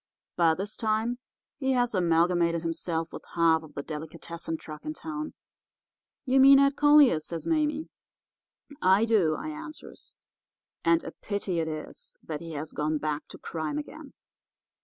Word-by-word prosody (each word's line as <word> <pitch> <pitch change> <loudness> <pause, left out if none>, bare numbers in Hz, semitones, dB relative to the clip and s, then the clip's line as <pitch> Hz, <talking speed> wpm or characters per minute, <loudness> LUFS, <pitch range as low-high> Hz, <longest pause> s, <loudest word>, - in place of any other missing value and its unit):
By 165 -2 +4
this 200 +4 -4
time 225 +2 0 0.4
he 265 -2 +1
has 245 -2 +1
amalgamated 170 -1 +2
himself 165 0 -2
with - - -8
half 165 -1 +4
the 140 - -4
delicatessen 160 +2 -6
truck 155 -1 -10
in 310 0 -5
town.' 305 -1 -6 0.9
"'You 265 0 +3
mean 275 +1 +9
Ed 275 0 +4
Collier?' 290 - +6
says 165 +1 -7
Mame. 305 -1 0 0.9
"'I 190 +4 +5
do,' 195 -9 +3
I 310 - -5
answers; 310 0 -10 0.7
'and 165 0 +3
a - - -6
pity 200 -4 -3
it 160 - -1
is 155 -1 -7
that 155 -2 -5
he 165 -1 -7
has 150 +1 -5
gone 155 +1 -1
back 150 0 -3
to - - -11
crime 155 -3 -4
again. 280 - -8
175 Hz, 150 wpm, -28 LUFS, 160-265 Hz, 0.9 s, mean